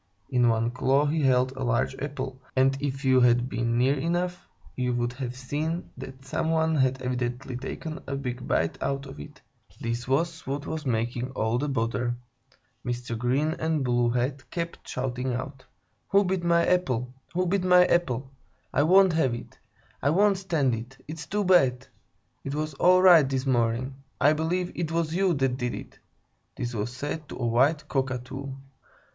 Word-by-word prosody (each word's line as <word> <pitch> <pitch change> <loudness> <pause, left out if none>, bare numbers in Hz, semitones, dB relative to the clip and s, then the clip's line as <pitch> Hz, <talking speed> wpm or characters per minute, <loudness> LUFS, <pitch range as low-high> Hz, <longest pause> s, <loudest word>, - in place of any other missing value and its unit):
In 125 -1 +4
one 115 +1 +1
claw 135 +3 +2
he 155 +2 0
held 130 -1 +3
a 130 0 -5
large 125 +1 +1
apple, 135 -2 -5
and 135 +1 +4
if 140 -1 -3
you 130 -1 +5
had 120 0 +4
been 120 -2 -1
near 130 +3 +4
enough, 175 +3 -2 0.3
you 125 -1 0
would 120 0 -1
have 125 -1 -5
seen 150 +6 -3
that 135 0 -10
some 145 +4 -1
one 160 0 +2
had 130 -3 +2
evidently 125 0 -3
taken 155 +5 -6
a 140 - -2
big 125 -2 -5
bite 80 0 0
out 140 0 -2
of 135 +1 -10
it. 150 0 -10 0.4
This 120 +1 -3
was 165 +5 -1
what 140 +2 -3
was 155 -3 -4
making 120 +1 -1
all 110 0 0
the 145 +2 -1
bother. 120 -1 -1 0.7
Mr. 120 -1 -3
Green 130 +7 +1
and 160 -3 0
Blue 120 -1 +2
Head 130 +3 -2
kept 170 -1 -5
shouting 125 0 -2
out: 130 +1 -6 0.4
"Who 200 +1 +4
bit 185 -1 -1
my 170 0 +3
apple? 130 -9 0 0.2
Who 180 +1 +2
bit 185 +1 +1
my 180 0 +6
apple? 135 -7 0 0.4
I 140 - +3
won't 185 +3 +5
have 135 -7 +2
it! 120 - -11 0.4
I 140 - +2
won't 195 +4 +3
stand 160 -9 +1
it! 120 +4 -6
It's 155 +1 -7
too 205 +1 0
bad! 135 -9 +4 0.6
It 135 +1 -4
was 155 0 -2
all 185 +5 +4
right 165 -7 +7
this 135 0 -1
morning! 120 0 +1 0.3
I 145 +3 +5
believe 175 +3 -1
it 165 -2 -3
was 165 -1 0
you 185 -1 +2
that 135 -2 0
did 125 -2 -2
it!" - - -10 0.6
(this 120 0 -4
was 110 +1 -2
said 145 +4 -5
to - - -7
a 120 - -2
white 140 +6 +2
Cockatoo). 135 0 -3
135 Hz, 180 wpm, -27 LUFS, 125-160 Hz, 0.7 s, right